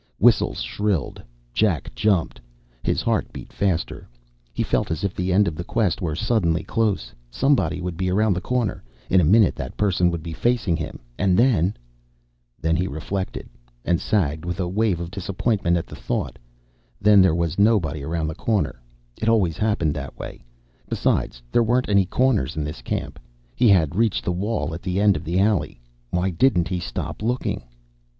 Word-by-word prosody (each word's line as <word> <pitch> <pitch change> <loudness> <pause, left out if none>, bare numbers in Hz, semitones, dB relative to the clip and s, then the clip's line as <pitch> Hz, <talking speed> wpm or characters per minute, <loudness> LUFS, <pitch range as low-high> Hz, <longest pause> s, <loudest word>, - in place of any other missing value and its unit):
Whistles - - +3
shrilled. 100 -9 -2 0.3
Jack 95 - 0
jumped. 90 - 0 0.4
His - - 0
heart - - 0
beat - - -10
faster. 95 -5 -2 0.4
He - - -1
felt - - 0
as 80 +1 -3
if 100 -1 -1
the 90 +1 -2
end 100 +2 +4
of 85 - -1
the 85 - -5
quest 105 -3 0
were 80 -4 -1
suddenly 85 -4 +1
close. 110 -3 -1 0.2
Somebody 135 - +1
would 90 -2 -4
be 95 0 -1
around 105 +2 +3
the 90 - -3
corner. 125 -3 -1 0.3
In 95 - +6
a - - +1
minute 105 +7 +5
that 65 - -6
person 95 -3 +2
would 85 -2 -4
be 85 -1 -6
facing 115 -3 +1
him, 80 -1 -5 0.2
and 95 -2 +3
then... 105 -6 +3 0.8
Then, 80 +1 +1
he 90 +3 0
reflected, 95 +5 -4 0.4
and 85 -1 +1
sagged 80 -7 0
with 90 +1 -4
a 90 - 0
wave 100 -1 +1
of 85 0 -5
disappointment 95 -1 0
at 85 - -3
the - - -11
thought, - - -3 0.6
then 105 -1 +6
there 95 -4 +4
was 85 0 -1
nobody 100 -9 +3
around 80 +3 -2
the 80 - -3
corner. 95 - -1 0.4
It 110 - +2
always 95 -8 +2
happened 105 -8 +1
that - - -7
way. - - -8 0.5
Besides, - - 0
there 120 - +4
weren't 120 +2 +1
any 100 -2 +4
corners 120 - +1
in 75 - 0
this 75 -4 -6
camp. - - -4 0.4
He 120 -2 +4
had 90 -5 +4
reached 110 0 +1
the - - +1
wall 100 -1 -2
at 85 - -6
the 95 0 -1
end 100 -1 +4
of 75 - -4
the 85 +3 0
alley. 100 - +1 0.3
Why 90 +5 0
didn't 90 -1 +2
he 90 -1 -1
stop - - -5
looking? 120 +4 -1
90 Hz, 185 wpm, -23 LUFS, 85-105 Hz, 0.8 s, In